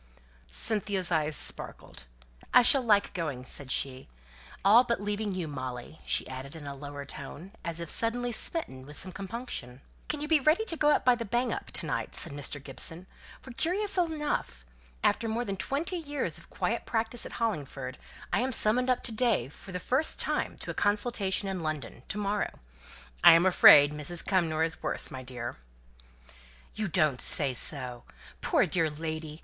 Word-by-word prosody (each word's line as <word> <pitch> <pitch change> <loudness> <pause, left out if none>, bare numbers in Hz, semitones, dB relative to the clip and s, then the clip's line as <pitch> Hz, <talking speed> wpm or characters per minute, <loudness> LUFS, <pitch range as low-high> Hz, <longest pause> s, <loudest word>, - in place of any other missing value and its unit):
Cynthia's 195 - +5
eyes 155 -2 +2
sparkled. - - -1 0.5
"I 250 - +9
shall 270 +3 +7
like 210 -4 +2
going," 145 -8 -4
said 135 0 -5
she 130 -1 -2 0.6
"all 220 +5 +8
but 235 -1 -1
leaving 205 -1 -2
you, 180 -3 -3
Molly," 130 +1 -7
she - - +1
added, 135 +3 -8
in 155 -2 -9
a 140 - -5
lower 145 0 -8
tone, 150 +7 -9
as 170 -1 -3
if 170 - -5
suddenly 240 +6 +2
smitten 220 - 0
with 145 0 -9
some 185 - -2
compunction. 195 - -6 0.3
"Can 300 - 0
you 300 - -4
be 315 -1 +4
ready 310 +10 +3
to 330 - -1
go 295 -2 +4
by 250 - +3
the 240 -1 -3
'Bang 240 +3 0
up' - - -6
to - - -3
night?" - - -3
said 165 - -4
Mr. 145 0 -3
Gibson; 160 +6 -3 0.4
"for, 260 - -10
curiously 360 - 0
enough, 290 - -3 0.4
after 230 - +2
more 235 +2 -1
than 195 - -3
twenty 285 - -2
years 290 -3 -3
of - - -18
quiet - - -2
practice 230 +1 -2
at - - -8
Hollingford, 140 - -3 0.3
I - - +3
am 255 +2 0
summoned 250 +2 +3
up 255 - +1
to - - -4
day 220 - +1
for 190 - -12
the 180 - -3
first 265 - -1
time - - 0
to - - -5
a - - -6
consultation 205 -2 0
in 190 -2 -3
London 155 -7 -4
to - - -3
morrow. 205 0 -2 0.7
I'm 165 +2 +8
afraid 145 -5 +8
Lady 150 +3 -4
Cumnor 165 -5 +1
is 160 0 -2
worse, - - -2
my 130 - -6
dear." 125 -2 -6 1.2
"You 215 -1 -2
don't 155 -7 +1
say 140 -4 +1
so? 125 -2 -5 0.4
Poor - - +3
dear 165 -3 +1
lady! 155 0 -6
185 Hz, 175 wpm, -29 LUFS, 145-240 Hz, 1.2 s, I